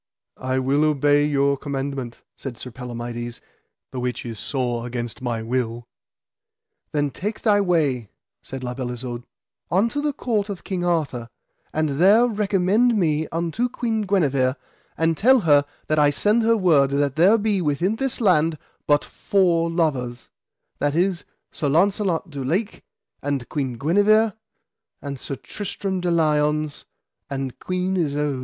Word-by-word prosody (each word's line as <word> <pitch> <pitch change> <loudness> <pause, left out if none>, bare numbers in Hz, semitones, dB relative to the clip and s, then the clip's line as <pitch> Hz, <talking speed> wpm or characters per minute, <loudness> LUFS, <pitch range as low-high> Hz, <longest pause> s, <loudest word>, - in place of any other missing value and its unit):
I 130 0 -1
will 135 +3 +2
obey 145 -1 +3
your 140 -1 +2
commandment, 135 -3 -4
said 130 -4 -7
Sir 125 - -8
Palamides, 120 -1 -6 0.5
the 130 - -4
which 125 0 -3
is 115 -2 -6
sore 120 -3 -2
against 120 -1 -5
my 120 -3 -2
will. 120 0 -2 1.0
Then 145 -2 0
take 210 +8 -4
thy 205 -2 +4
way, 145 - +1 0.3
said 135 -1 -8
La 125 0 -3
Beale 125 -1 -4
Isoud, 120 0 -6 0.4
unto 230 +10 +1
the 295 0 0
court 220 -7 -1
of 195 -3 -6
King 185 -2 -3
Arthur, 150 -9 -1 0.4
and 155 0 0
there 210 +6 +6
recommend 210 +1 +2
me 155 -4 +1
unto 170 +9 -1
Queen 225 -3 -1
Guenever, 140 -10 +1 0.4
and 165 0 +2
tell 255 +7 +5
her 145 -5 +4 0.2
that 155 0 +1
I 145 -1 +5
send 210 +9 +2
her 230 0 +3
word 155 -8 +4
that 140 -1 0
there 185 +8 +5
be 205 -3 0
within 170 +7 0
this 270 0 -2
land 165 -7 +3 0.3
but 145 0 +3
four 170 -4 +1
lovers, 135 -8 -1 0.5
that 145 +1 0
is, 180 +1 +1 0.3
Sir 145 - -2
Launcelot 185 +1 +1
du 140 -2 -5
Lake 190 - -2 0.4
and 140 -4 -2
Queen 135 -4 -2
Guenever, 205 - +3 0.7
and 140 -2 -6
Sir 140 - -5
Tristram 195 +2 -4
de 175 - 0
Liones 150 -2 +1 0.4
and 135 -2 -4
Queen 185 +1 -1
Isoud. 145 -5 0
150 Hz, 150 wpm, -23 LUFS, 135-190 Hz, 1.0 s, there